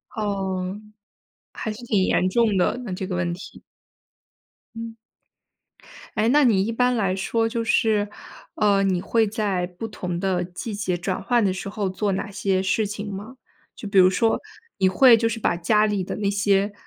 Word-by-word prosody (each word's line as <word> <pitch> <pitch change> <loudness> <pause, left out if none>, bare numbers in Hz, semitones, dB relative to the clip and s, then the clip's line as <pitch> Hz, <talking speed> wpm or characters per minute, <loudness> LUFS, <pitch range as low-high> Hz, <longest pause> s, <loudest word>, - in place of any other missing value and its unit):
哦， 195 -2 -2 0.7
还 220 - -4
是 220 +3 -11
挺 205 -5 +2
严 185 - +2
重 220 -1 +2
的， 180 +6 +2
那 195 - -5
这 185 +1 -4
个 185 - -4
问 175 -1 -1
题。 180 - -11 1.1
嗯。 230 0 -7 1.2
诶， 215 - +2
那 295 +2 +5
你 205 -5 +3
一 230 - -2
般 250 +1 +2
来 195 -4 0
说 225 +4 0
就 230 0 -2
是， 215 -2 +2 0.5
呃， 200 -2 +3
你 190 -2 +1
会 225 +3 +1
在 200 -5 -1
不 180 +5 -7
同 180 -5 -4
的 185 -2 0
季 180 +5 -6
节 195 -3 -2
转 185 +1 -3
换 240 -4 +2
的 185 - +1
时 195 +1 -5
候 205 -1 -2
做 200 +2 -1
哪 200 +1 -4
些 195 -2 0
事 205 +2 +1
情 205 0 -6
吗？ 215 +7 -8 0.4
就 210 - -8
比 200 -1 +3
如 185 0 +7
说， 225 +4 +2 0.4
你 190 - +4
会 240 +5 +7
就 230 0 +1
是 225 - -4
把 175 - +1
家 210 +5 +2
里 205 -3 -1
的 - - -5
那 205 -1 -2
些 200 0 +1
200 Hz, 200 characters per minute, -23 LUFS, 190-225 Hz, 1.2 s, 如